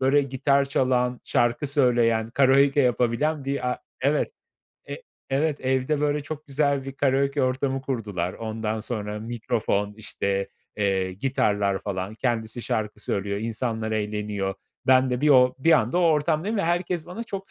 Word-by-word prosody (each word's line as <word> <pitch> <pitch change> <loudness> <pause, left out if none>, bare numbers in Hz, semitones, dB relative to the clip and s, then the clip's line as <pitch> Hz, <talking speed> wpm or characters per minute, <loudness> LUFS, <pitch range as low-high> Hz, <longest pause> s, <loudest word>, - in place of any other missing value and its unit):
böyle 135 +2 +4
gitar 140 +1 +1
çalan, 125 -2 0
şarkı 120 +5 +1
söyleyen, 120 -5 +2
karaoke 140 +2 +4
yapabilen 125 +4 +1
bir 135 -2 -1
a - - -4 0.2
evet, 150 - +1 0.6
e - - -6 0.3
evet, 145 +2 0
evde 130 +3 0
böyle 150 0 +1
çok 155 +1 -7
güzel 140 -1 0
bir 135 - -6
karaoke 140 0 +1
ortamı 130 +1 0
kurdular. 105 -9 -3
Ondan 110 -1 -3
sonra 105 -2 -4
mikrofon 110 -3 -2
işte, 100 -2 -2 0.3
eee, 95 -3 0
gitarlar 100 -3 0
falan 95 0 -4
kendisi 115 -1 -2
şarkı 105 -2 -2
söylüyor, 100 0 -1
insanlar 110 -1 -2
eğleniyor. 105 -2 -2 0.3
Ben 130 0 +5
de 125 +1 -1
bir 150 - +3
o 125 -2 +6
bir 165 +5 +4
anda 120 +5 +3
o - - +3
ortamdayım 165 +5 +2
ve 200 - +1
herkes 175 0 -1
bana 180 +6 -6
çok 195 -4 -7
130 Hz, 150 wpm, -25 LUFS, 110-140 Hz, 0.6 s, o